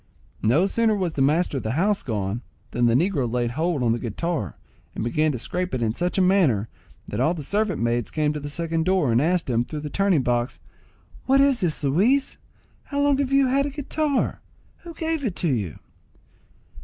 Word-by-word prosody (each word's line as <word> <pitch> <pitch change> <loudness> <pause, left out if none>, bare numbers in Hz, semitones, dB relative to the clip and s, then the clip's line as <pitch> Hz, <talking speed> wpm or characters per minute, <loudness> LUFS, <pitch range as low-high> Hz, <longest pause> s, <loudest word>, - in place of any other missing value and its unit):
No 130 - +3
sooner 220 +2 +2
was 185 -5 -1
the 140 - -2
master 150 +2 +2
of 130 - -4
the 110 - -2
house 200 +7 +1
gone, 105 -1 -3 0.3
than 120 0 +2
the 115 - +3
negro 145 - +1
laid 120 -1 0
hold 160 0 -1
on 115 - +2
the 120 - 0
guitar, 120 - -3 0.4
and - - -3
began 155 +6 +1
to 130 - -3
scrape 180 +7 -3
it 120 - -1
in 110 -1 0
such 180 - -2
a 190 - +4
manner, 160 - +3 0.4
that 105 - -4
all 155 +7 +2
the 155 - -6
servant 200 +2 0
maids 120 0 0
came 150 -1 0
to 150 - -4
the 145 0 -6
second 165 +1 -1
door, 185 -9 +2
and 115 +2 +3
asked 175 +2 +1
him, 120 -2 +1
through 150 +4 -6
the 150 -1 -6
turning 195 -7 +2
box, 120 0 -1 0.7
"What 270 +1 +5
is 275 -3 +3
this, 160 -4 0
Luis? 210 - +2 0.5
How 285 - -3
long 285 -1 +3
have 275 -2 0
you 275 0 +4
had 275 +2 +2
a - - -3
guitar? 290 0 -1 0.4
Who 340 -1 -11
gave 320 -3 -2
it 200 -7 -3
you?" 115 - -1
160 Hz, 205 wpm, -24 LUFS, 120-200 Hz, 0.7 s, What